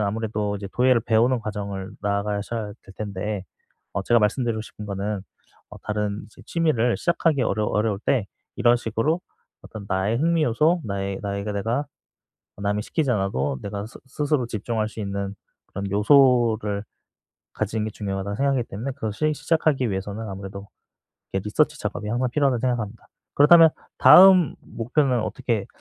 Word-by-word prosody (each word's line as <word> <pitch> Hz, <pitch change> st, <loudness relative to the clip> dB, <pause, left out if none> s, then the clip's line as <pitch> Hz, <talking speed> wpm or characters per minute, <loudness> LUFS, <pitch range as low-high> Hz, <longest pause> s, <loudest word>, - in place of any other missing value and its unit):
아무래도 105 Hz, 0 st, -1 dB
이제 100 Hz, -1 st, -7 dB
도예를 125 Hz, -1 st, +4 dB
배우는 115 Hz, +2 st, +2 dB
과정을 100 Hz, -3 st, -5 dB
나아가셔야 105 Hz, +1 st, -2 dB
될 95 Hz, -, -15 dB
텐데 100 Hz, -1 st, -4 dB, 0.5 s
어 100 Hz, -, -2 dB
제가 120 Hz, +2 st, +3 dB
말씀드리고 115 Hz, +1 st, 0 dB
싶은 105 Hz, -1 st, -10 dB
거는 100 Hz, 0 st, -3 dB, 0.5 s
어 -, -, -10 dB
다른 105 Hz, -1 st, -2 dB
이제 -, -, -17 dB
취미를 140 Hz, -8 st, +1 dB
시작하기 165 Hz, -5 st, +1 dB
어려 110 Hz, -2 st, 0 dB
어려울 105 Hz, -1 st, 0 dB
때 120 Hz, -7 st, +1 dB, 0.3 s
이런 120 Hz, 0 st, +4 dB
식으로 120 Hz, -, -1 dB, 0.4 s
어떤 105 Hz, -2 st, -9 dB
나의 100 Hz, +5 st, 0 dB
흥미 165 Hz, +1 st, +2 dB
요소 155 Hz, +8 st, +2 dB
나의 100 Hz, -1 st, -3 dB
나의 100 Hz, 0 st, -3 dB
그 105 Hz, -, -3 dB
내가 115 Hz, +8 st, -1 dB, 0.7 s
남이 100 Hz, +1 st, -1 dB
시키지 155 Hz, -5 st, -1 dB
않아도 75 Hz, -, -1 dB
내가 100 Hz, 0 st, -5 dB
스 115 Hz, -, -12 dB
스스로 145 Hz, -1 st, 0 dB
집중할 110 Hz, 0 st, -2 dB
수 110 Hz, -, -10 dB
있는 100 Hz, 0 st, -3 dB, 0.3 s
그런 100 Hz, 0 st, -5 dB
요소를 110 Hz, -3 st, +3 dB, 0.7 s
가지는 110 Hz, +1 st, -2 dB
게 110 Hz, -, -4 dB
중요하다고 100 Hz, 0 st, -4 dB
생각하기 135 Hz, -1 st, +1 dB
때문에 115 Hz, +8 st, -4 dB
그것을 130 Hz, +8 st, -1 dB
시작하기 150 Hz, -8 st, +1 dB
위해서는 100 Hz, +3 st, -4 dB
아무래도 100 Hz, +1 st, -8 dB, 0.7 s
이렇게 95 Hz, 0 st, -2 dB
리서치 150 Hz, +7 st, +1 dB
작업이 105 Hz, 0 st, -4 dB
항상 125 Hz, +3 st, 0 dB
필요하다고 135 Hz, -4 st, +1 dB
생각합니다. 120 Hz, -4 st, -2 dB, 0.3 s
그렇다면 160 Hz, +2 st, +8 dB, 0.3 s
다음 180 Hz, +3 st, +8 dB
목표는 125 Hz, +1 st, 0 dB
어떻게 110 Hz, -4 st, -2 dB
110 Hz, 375 characters per minute, -24 LUFS, 100-130 Hz, 0.7 s, 그렇다면